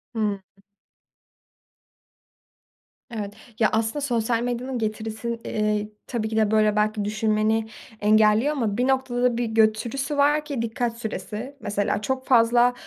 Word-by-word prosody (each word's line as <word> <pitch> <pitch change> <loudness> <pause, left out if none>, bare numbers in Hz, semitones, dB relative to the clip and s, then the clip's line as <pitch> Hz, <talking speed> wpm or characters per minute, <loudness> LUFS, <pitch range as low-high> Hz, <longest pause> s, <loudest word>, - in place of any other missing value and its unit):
Hıı. 210 -3 -1 2.7
Evet. 205 -3 -5 0.3
Ya 220 - +4
aslında 225 +6 0
sosyal 235 -4 0
medyanın 245 +1 -2
getirisin 220 +1 -3
eee 210 -1 -1 0.2
tabii 225 -3 -2
ki 220 - -2
de 215 -1 +2
böyle 215 -1 +3
belki 210 0 +1
düşünmeni 215 +1 +1 0.3
engelliyor 215 +5 +4
ama 230 -8 -1
bir 250 +1 +1
noktada 250 -2 +1
bir 240 - 0
götürüsü 225 +6 +1
var 295 +1 +3
ki 280 -6 -3
dikkat 230 0 -2
süresi, 215 +4 -5
mesela 205 -1 -1
çok 260 +3 -2
fazla 240 0 +5
225 Hz, 125 wpm, -24 LUFS, 215-245 Hz, 2.7 s, fazla